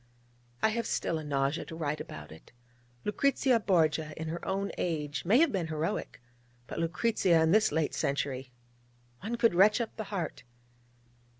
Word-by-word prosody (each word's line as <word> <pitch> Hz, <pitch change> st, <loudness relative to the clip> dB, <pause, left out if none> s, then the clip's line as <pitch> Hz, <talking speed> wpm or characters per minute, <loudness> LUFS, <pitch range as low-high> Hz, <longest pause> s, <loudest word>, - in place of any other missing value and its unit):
I 220 Hz, -, +5 dB
have 230 Hz, +1 st, -2 dB
still 160 Hz, -, -1 dB
a -, -, -6 dB
nausea 140 Hz, +2 st, 0 dB
to 160 Hz, -, -8 dB
write 150 Hz, -2 st, -2 dB
about 75 Hz, 0 st, -9 dB
it! 80 Hz, -, -14 dB, 0.5 s
Lucrezia 260 Hz, +2 st, +2 dB
Borgia 160 Hz, -6 st, +1 dB
in 160 Hz, 0 st, -4 dB
her 170 Hz, +2 st, -5 dB
own 195 Hz, +1 st, -1 dB
age 150 Hz, -3 st, -2 dB
may 205 Hz, +7 st, +5 dB
have 320 Hz, 0 st, +4 dB
been 180 Hz, -5 st, -1 dB
heroic: 160 Hz, +5 st, -3 dB, 0.5 s
but -, -, -6 dB
Lucrezia 175 Hz, +1 st, +2 dB
in 160 Hz, -, +3 dB
this 215 Hz, +2 st, +4 dB
late 160 Hz, -2 st, 0 dB
century! 135 Hz, -2 st, -2 dB, 0.7 s
One 225 Hz, +4 st, -3 dB
could 235 Hz, -3 st, +3 dB
retch 205 Hz, +6 st, +5 dB
up 235 Hz, -2 st, -3 dB
the 220 Hz, -, -4 dB
heart... 190 Hz, -5 st, -4 dB
170 Hz, 165 wpm, -30 LUFS, 155-215 Hz, 0.7 s, I